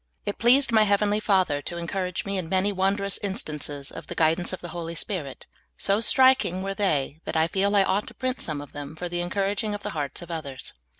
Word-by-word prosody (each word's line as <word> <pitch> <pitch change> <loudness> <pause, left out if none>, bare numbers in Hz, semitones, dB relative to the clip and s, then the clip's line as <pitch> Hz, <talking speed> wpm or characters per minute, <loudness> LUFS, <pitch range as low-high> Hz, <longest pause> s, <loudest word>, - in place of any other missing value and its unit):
It 205 - -3
pleased 250 +2 +5
my 220 -1 +5
heavenly 205 +1 +2
Father 185 -9 +2
to 170 +4 -5
encourage 180 +1 -3
me 195 -1 -1
by 165 - -9
many 190 +3 +1
wondrous 200 +1 +1
instances 150 - -4
of - - -9
the - - -6
guidance 165 +2 +2
of 185 - -5
the 175 - -8
Holy 170 0 -5
Spirit; 160 -6 -4 0.3
so 200 +1 +2
striking 250 -6 +4
were 195 0 -2
they 155 -7 0
that - - -4
I 160 +1 +4
feel 200 +3 +1
I 200 - +6
ought 195 +2 0
to - - -10
print 255 0 -2
some 150 -3 -3
of 145 - -11
them 145 +1 -7
for 175 +2 -4
the 175 0 -2
encouraging 200 +3 -1
of 205 - -8
the - - -3
hearts 145 +1 -4
of 170 - -9
others. 140 -5 -6
185 Hz, 225 wpm, -26 LUFS, 160-205 Hz, 0.3 s, I